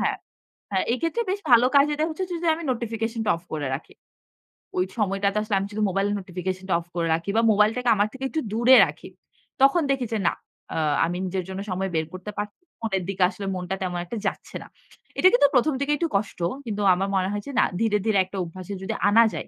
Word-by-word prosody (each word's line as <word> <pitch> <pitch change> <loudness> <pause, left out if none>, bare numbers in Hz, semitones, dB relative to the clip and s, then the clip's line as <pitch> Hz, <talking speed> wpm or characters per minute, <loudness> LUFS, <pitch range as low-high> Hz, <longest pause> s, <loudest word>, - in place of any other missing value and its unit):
হ্যাঁ, - - 0 0.6
হ্যাঁ, 190 - +1
এক্ষেত্রে 330 - -1
বেশ 400 - -2
ভালো 240 +1 +7
কাজ 280 0 +7
দেয় 315 - +2
হচ্ছে 375 +4 -3
যে 340 -1 -2
আমি 335 - -7
নোটিফিকেশন 225 -1 -3
টা - - +3
অফ 170 - -17
করে 145 -3 -2
রাখি। 145 - -10 0.8
ওই 365 - +3
সময়টাতে 200 -1 0
আসলে 215 -1 -1
আমি 195 - -3
শুধু 215 +1 -2
মোবাইল 195 +2 0
নোটিফিকেশন 185 0 -5
টা - - +2
অফ 170 - -16
করে 170 -1 0
রাখি 165 +4 -5
বা - - +5
মোবাইলটাকে 215 +4 +2
আমার 205 0 +2
থেকে 265 0 -8
একটু 315 - -2
দূরে 240 +3 +6
রাখি। - - -9 0.5
তখন 275 +6 +5
দেখি 265 -2 -2
যে 220 - 0
না - - +3 0.4
আ - - -2 0.3
আমি 175 +2 -3
নিজের 185 0 -2
জন্য 190 +1 -5
সময় 190 +1 -1
বের 160 0 +1
করতে 185 +3 -7
পারছি। 205 - -5 0.2
ফোনের 195 -5 -1
দিকে 195 -1 +1
আসলে 200 0 -7
মনটা 180 +1 -3
তেমন 180 -2 -2
একটা 230 +6 -5
যাচ্ছে - - -5
না। - - -14 0.5
এটা - - +7
কিন্তু 485 -12 +6
১ম 280 +5 +3
দিকে 280 +1 0
একটু 335 0 -1
কষ্ট। 200 -1 -1 0.3
কিন্তু 210 -3 -3
আমার 190 +2 -1
মনে 190 0 +1
হয়েছে 205 +7 -5
না - - +6 0.2
ধীরে, 220 -2 +2
ধীরে 215 -2 +2
একটা 190 +2 -8
অভ্যাসে 185 +3 -8
যদি 215 +3 -2 0.2
আনা 225 +3 +6
যায়, - - -5
205 Hz, 220 wpm, -24 LUFS, 185-245 Hz, 0.8 s, ভালো